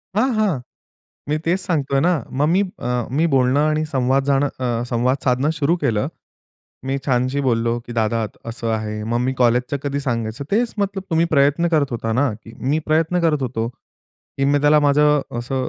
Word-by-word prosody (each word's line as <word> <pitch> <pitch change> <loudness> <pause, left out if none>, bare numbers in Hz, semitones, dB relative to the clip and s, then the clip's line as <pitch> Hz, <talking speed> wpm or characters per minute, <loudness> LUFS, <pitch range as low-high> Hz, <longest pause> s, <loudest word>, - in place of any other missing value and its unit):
हां, 255 +6 +2
हां. 200 -10 +1 0.7
मी 150 - +1
तेच 175 +3 +1
सांगतो 155 -7 -1
आहे 135 - +4
ना. 175 - +3 0.3
मग 145 - +3
मी 190 - +4 0.2
अ, 120 - -4 0.3
मी 160 +3 +3
बोलणं 130 +1 +3
आणि 155 +1 +1
संवाद 130 +1 +2
जाणं 140 0 +2
अ, 120 -2 -1
संवाद 120 +2 +1
साधणं 130 +3 +2
सुरू 155 +4 +2
केलं. 110 -10 0 0.8
मी 135 +1 0
छानशी 130 +1 +1
बोललो 115 -3 +1
की 120 - -7
"दादा 115 +1 +1
अत 110 - -6
असं 115 0 -4
आहे." 105 -1 -3
मग 120 - +2
मी 130 - 0
कॉलेजचं 125 +3 +2
कधी 140 0 -2
सांगायचं 120 -1 -3
तेच 230 +3 +1 0.3
तुम्ही 170 -3 0
प्रयत्न 145 +3 +3
करत 145 -3 +2
होता 115 -2 -2
ना, 130 +4 +2
की 110 +1 -14 0.2
मी 150 - +2
प्रयत्न 160 +3 +2
करत 155 -4 +1
होतो 115 -3 -2
की 135 +2 -9
मी 145 +1 +3
त्याला 150 +1 +5
माझं 150 0 +4 0.2
असं 130 +2 -2
135 Hz, 190 wpm, -20 LUFS, 120-150 Hz, 0.8 s, त्याला